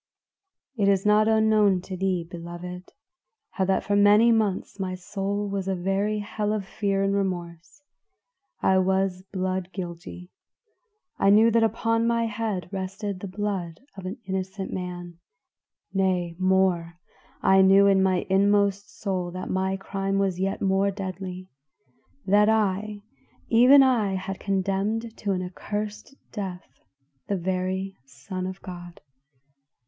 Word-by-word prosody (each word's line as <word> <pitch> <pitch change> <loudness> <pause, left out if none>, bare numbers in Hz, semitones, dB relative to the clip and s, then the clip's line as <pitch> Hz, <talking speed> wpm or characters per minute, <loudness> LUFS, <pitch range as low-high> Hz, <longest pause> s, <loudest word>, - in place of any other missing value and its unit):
"It 200 -3 +2
is 195 -1 +2
not 210 +1 +4
unknown 215 -3 +4
to 185 +1 -7
thee, 185 -2 -1
beloved, 175 +1 -8 0.6
how 190 - -1
that 190 0 +1
for 205 - 0
many 205 +3 +6
months 210 -3 0
my 185 -1 -2
soul 200 +2 -3
was 195 -1 -3
a 190 - 0
very 195 +4 0
hell 210 0 -2
of 210 -3 -3
fear 195 -1 -1
and 195 0 +1
remorse. 180 - -4 0.8
I 190 0 +4
was 190 0 +1
blood 185 -1 -2
guilty; 180 0 -8 0.9
I 195 - +4
knew 220 +3 +6
that 230 +1 +3
upon 230 +1 +1
my 235 0 +1
head 215 -4 -3
rested 195 +1 -4
the 200 - -6
blood 190 -3 -4
of 190 -2 -7
an 195 +7 -5
innocent 190 +1 -4
man; 175 -2 -6 0.7
nay 185 -3 0
more, 185 -3 +1 0.5
I 190 0 +6
knew 195 +1 +6
in 195 -1 +4
my 185 -1 +1
inmost 200 +1 +2
soul 185 -4 -2
that 185 0 -5
my 190 +1 0
crime 195 0 -2
was 195 -2 0
yet 195 +2 -1
more 195 +1 +2
deadly 185 -1 -6 0.8
that 210 +2 +4
I, 210 -1 0 0.5
even 255 +4 +7
I, 225 -7 +2
had 190 +1 -5
condemned 200 +4 -1
to 200 -2 -1
an 185 -1 -2
accursed 210 +7 -5 0.2
death 190 -4 -6 0.6
the 200 - 0
very 190 +2 -2
Son 185 +8 -6
of 185 +1 -8
God. 175 -1 -9
195 Hz, 140 wpm, -25 LUFS, 185-205 Hz, 0.9 s, even